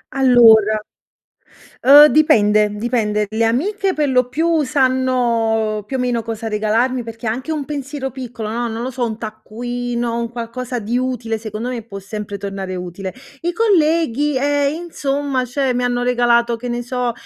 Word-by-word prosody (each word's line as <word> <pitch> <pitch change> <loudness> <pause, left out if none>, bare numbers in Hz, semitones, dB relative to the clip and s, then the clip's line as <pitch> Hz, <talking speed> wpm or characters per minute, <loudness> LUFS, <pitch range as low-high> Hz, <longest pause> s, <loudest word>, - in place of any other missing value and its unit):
Allora, 225 -5 +6 1.0
ehm, 290 +3 +9
dipende, 215 -9 +4
dipende, 210 -2 -1
le 220 +2 -1
amiche 380 - 0
per 300 -1 0
lo 250 -1 +2
più 320 +3 +1
sanno 245 -5 +1
più 265 +5 -3
o - - -4
meno 245 -2 0
cosa 225 0 -5
regalarmi, 225 +4 0
perché 225 0 -7
è - - +2
anche 255 +8 -4
un 300 -3 -3
pensiero 280 -2 -5
piccolo, 245 -4 -6
no, 235 +2 -2
non 225 +1 -5
lo 255 - -3
so, 250 -1 -2
un 220 -2 -4
taccuino, 235 +2 -4
un 235 0 -2
qualcosa 245 +1 -5
di 230 +3 -2
utile 250 -3 -2
secondo 215 +1 -6
me 250 -2 -4
può 200 -3 -8
sempre 205 +1 -6
tornare 195 -1 -5
utile. 180 +1 -6 0.3
I 345 - -1
colleghi, 320 - +2
eh, 285 +1 +1
insomma, 285 -4 -2
cioè, 255 +1 -1
mi 250 0 -1
hanno 245 0 0
regalato, 240 -1 +2
che 245 +2 -6
ne 240 0 -2
so, 250 0 -2
245 Hz, 165 wpm, -18 LUFS, 225-265 Hz, 1.0 s, ehm